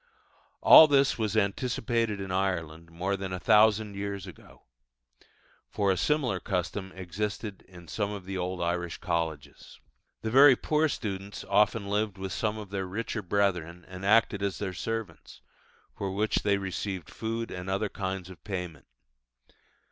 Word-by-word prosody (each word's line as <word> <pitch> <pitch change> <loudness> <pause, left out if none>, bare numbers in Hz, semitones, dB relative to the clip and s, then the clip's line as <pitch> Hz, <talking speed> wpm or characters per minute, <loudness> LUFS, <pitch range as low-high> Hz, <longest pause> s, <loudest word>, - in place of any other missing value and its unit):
All 160 - +10
this 140 -3 +3
was 110 -1 0
anticipated 115 +1 0
in 95 -1 -5
Ireland 85 -4 -2
more 90 +4 -2
than 95 -1 -5
a 90 - -3
thousand 105 +1 +4
years 100 -1 -4
ago; 90 - -14 1.1
for 100 -2 +1
a - - +2
similar 130 - 0
custom 95 +1 -3
existed 100 +3 -4
in 90 -2 -14
some 100 +2 -2
of 100 -3 -7
the 95 +1 -5
old 90 -1 -2
Irish 85 0 -2
colleges. 80 -4 -4 0.4
The 110 - -2
very 135 +1 +8
poor 155 +4 +1
students 100 -5 -5
often 105 0 +2
lived 105 -1 -1
with 95 0 -5
some 110 -1 -1
of 105 -3 -8
their 95 -2 -3
richer 110 +3 -3
brethren, 90 -3 -1
and 95 0 -9
acted 105 0 +3
as 100 -1 -1
their 95 -3 -4
servants, 95 - -5 0.5
for 100 - -3
which 105 +3 0
they 100 -1 +2
received 95 -2 -4
food 115 +1 -4
and 90 +1 -6
other 100 +3 0
kinds 95 -2 -4
of 90 - -14
payment. 90 -8 -6
100 Hz, 155 wpm, -28 LUFS, 90-110 Hz, 1.1 s, All